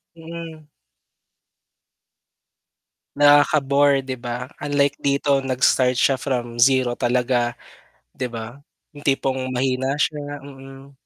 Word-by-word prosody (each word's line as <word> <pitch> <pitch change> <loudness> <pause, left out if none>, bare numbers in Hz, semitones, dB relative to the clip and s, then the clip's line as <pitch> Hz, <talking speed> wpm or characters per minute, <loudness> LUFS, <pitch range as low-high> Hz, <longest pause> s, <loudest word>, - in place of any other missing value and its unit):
Mm. 165 -2 -10 2.5
Nakaka-bore, 145 -1 +4
'di 130 -1 -4
ba? 125 +1 -4 0.2
Unlike 145 -1 +1
dito 140 0 +1
nag-start 130 -1 +2
siya 135 - +3
from 120 -3 -3
0 130 -1 +4
talaga, 120 0 0 0.5
'di 125 - -4
ba? 115 +3 -8 0.3
Yung 145 0 -13
tipong 130 -1 0
mahina 130 +2 0
siya, 145 -1 -3
mm. 135 0 -13
135 Hz, 100 wpm, -21 LUFS, 125-145 Hz, 2.5 s, Nakaka-bore